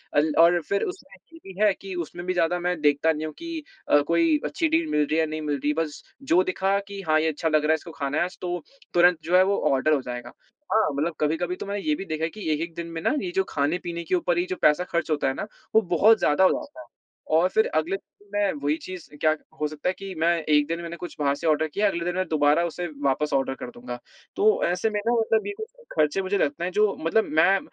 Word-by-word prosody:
अल 150 +1 +3
और 170 +1 +6
फिर 200 0 +1
उसमें 365 -7 -7 0.2
ये 330 - -12
भी 200 - -7
है 205 -2 +5
कि 195 -1 -7
उसमें 175 +1 -5
भी 185 - 0
ज़्यादा 175 0 +1
मैं 180 -1 -1
देखता 145 +2 +3
नहीं 155 0 -3
हूँ 155 - -6
कि 335 -2 -6 0.3
अ, 145 - +6
कोई 310 - +3
अच्छी 330 -3 0
डील 325 +1 +2
मिल 150 - +2
रही 155 - -1
है - - +2
या 160 - +3
नहीं 155 0 -4
मिल 150 -1 -1
रही 150 +1 +2
बस 160 -2 -3 0.2
जो 185 -10 +3
दिखा 190 +2 0
कि, 200 0 -8
"हाँ, 155 0 +4
ये 160 - +1
अच्छा 160 +2 -2
लग 155 -1 +2
रहा 150 - +3
है, - - +5
इसको 160 +2 -9
खाना 140 -1 -3
है - - +3
आज।" 180 +1 -5
तो 175 -2 -3 0.3
तुरंत 175 -1 +5
जो 175 +3 +1
है, 185 - +7
वो 200 +1 +1
ऑर्डर 140 +3 +2
हो 140 - +1
जाएगा। 125 -1 -7 0.4
हाँ, 220 -4 +3
मतलब 155 +4 -1
कभी-कभी 165 +4 0
तो - - -7
मैंने 200 0 -3
ये 150 - +3
भी 195 - -6
देखा 160 -1 -2
कि 205 -7 -5
एक-एक 165 +2 -3
दिन 170 0 -5
में 165 -1 -6
ना, - - +1
ये 355 - -3
जो 385 - +3
खाने-पीने 170 +3 -2
के 175 - 0
ऊपर 175 -1 0
ये 175 - +1
जो 185 - -1
पैसा 150 +4 +4
खर्च 170 -3 -2
होता 145 -2 +1
है 135 - +1
ना, 200 - -5 0.3
वो 220 - +7
बहुत 205 +4 +4
ज़्यादा 150 +6 +3
हो 185 - +7
जाता 315 +2 -7
है - - -12 0.5
और 180 +2 +4
फिर 220 - +3
अगले 160 +5 +1
दिन 205 - -27
मैं 205 -1 +2
वही 145 +2 +2
चीज़ 185 -3 -8
क्या 155 0 +4
क - - -23 0.2
हो 150 - +2
सकता 155 +3 -3
है 185 - 0
कि 195 -1 -6
मैं 165 +1 +3
एक 150 -1 +3
दिन 165 +1 -3
मैंने 170 0 -6
कुछ 175 - -8
बाहर 140 -1 +2
से 160 - -4
ऑर्डर 155 0 +2
किया, 205 +7 +1
अगले 170 -3 -2
दिन 175 - -1
मैं 185 0 -1
दोबारा 150 +1 +3
उसे 175 +1 -4 0.2
वापस 140 +2 +1
ऑर्डर 135 -1 +1
कर 125 - -7
दूँगा। 120 0 -8 0.4
तो 435 +5 +3
ऐसे 225 - 0
में 210 -1 -2
ना, 235 - +4
मतलब 225 - +1
ये 410 - -3
कुछ 440 0 -6 0.3
ख़र्चे, 155 +5 +2
मुझे 195 +1 0
लगता 145 +1 -1
है, 180 - -3
जो 210 +1 +2
मतलब 165 +8 +2 0.2
मैं 195 +4 +5
170 Hz, 270 wpm, -25 LUFS, 155-195 Hz, 0.5 s, है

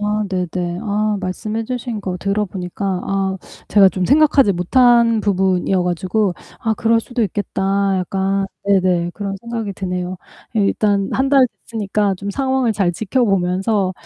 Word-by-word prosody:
아 210 +1 0
네네. 180 -1 -2
아 210 -1 0
말씀해 215 +4 -3
주신 245 -2 -4
거 185 -2 -4
들어 200 +3 -1
보니까 180 0 -6 0.2
아 195 -1 -1 0.3
제가 195 -2 +6
좀 185 -1 -2
생각하지 285 -5 +4
못한 235 +5 +4
부분이어 190 -2 +1
가지고 185 +3 0 0.3
'아 225 - 0
그럴 230 +2 +2
수도 240 +1 -2
있겠다.' 195 -1 0
약간 195 +1 -1 0.2
네네 185 -3 +2
그런 200 0 -4
생각이 230 -3 -4
드네요. 180 -1 -4 0.4
일단 200 -1 +1
1 265 +1 +1
달 270 -2 +5
됐으니까 205 -2 -1
좀 200 +2 -5
상황을 265 -1 0
잘 195 -4 +1
지켜 220 +8 0
보면서 190 +1 +1
200 Hz, 295 characters per minute, -19 LUFS, 185-225 Hz, 0.4 s, 제가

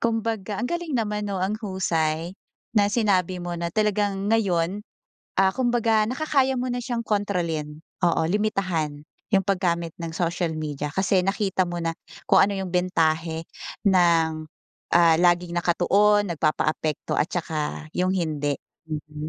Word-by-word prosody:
Kumbaga, 225 -3 -1
ang - - -2
galing 340 0 -2
naman, 210 -2 -1
'no, 195 - -2
ang 190 +2 0
husay, 170 -5 -1 0.4
na 205 -2 +4
sinabi 200 -5 +1
mo 175 -1 -5
na 170 - -1
talagang 205 0 0
ngayon, 190 -3 +1 0.6
ah, 190 0 +4
kumbaga 235 -3 +2
nakakaya 265 0 +1
mo 250 +1 -1
na 245 - -2
siyang 240 -1 -3
kontrolin. 170 -8 -2 0.2
Oo, 170 -2 +2
limitahan 185 -8 -1 0.3
'yong 195 -1 +4
paggamit 175 -4 0
ng 165 -1 -4
social 170 -1 -1
media 150 -2 -3
kasi 190 +2 +2
nakita 195 -1 +1
mo 175 - -4
na, 165 0 -1 0.4
kung - - +6
ano 200 0 +1
'yong 190 -2 -4
bentahe 165 -2 +1 0.4
ng, 165 -4 +3 0.5
ah, 170 -2 +6
laging 175 0 +3
nakatuon, 200 +4 +3
nagpapaapekto 155 -1 -1
at 155 - +1
saka 155 -3 -3
'yong 185 +1 +2
hindi, 150 -5 -1 0.3
mhm, 150 0 -5
185 Hz, 140 wpm, -24 LUFS, 165-210 Hz, 0.6 s, kung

